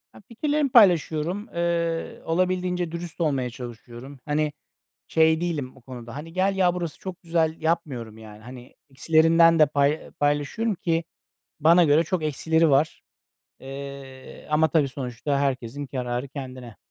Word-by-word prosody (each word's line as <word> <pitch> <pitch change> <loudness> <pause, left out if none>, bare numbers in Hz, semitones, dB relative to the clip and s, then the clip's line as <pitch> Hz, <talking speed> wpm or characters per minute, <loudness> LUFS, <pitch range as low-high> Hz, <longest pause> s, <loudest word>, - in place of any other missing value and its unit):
Ya, - - -14
fikirlerimi 290 +4 0
paylaşıyorum, 180 - +3
eee, 170 -1 -1
olabildiğince 180 0 0
dürüst 170 0 -7
olmaya 135 -6 0
çalışıyorum. 120 +2 -10
Hani, 150 0 0 0.6
şey 160 0 +3
değilim 150 -8 -3
o - - -16
konuda, 120 -1 -10
hani, 160 +3 -8
gel 190 +2 +1
ya, 180 -2 +3
burası 170 -3 -4
çok 185 -2 -8
güzel, 165 -2 0
yapmıyorum. 140 -9 -2
Yani, 110 -1 -12
hani, 125 +1 -12 0.2
eksilerinden 165 +4 +4
de 155 - +7
pay 145 +1 0
paylaşıyorum 145 +9 0
ki 165 -2 -1 0.6
bana 170 +3 +6
göre 155 +2 +4
çok 175 +1 -2
eksileri 160 +2 +2
var. 145 +3 +1 0.6
Eee, 135 -1 -9
ama, 155 +1 +3
tabii, 150 -1 +2
sonuçta 130 +1 -3
herkesin 135 0 -2
kararı 125 0 -3
kendine. 130 -4 -9
155 Hz, 140 wpm, -24 LUFS, 135-170 Hz, 0.6 s, de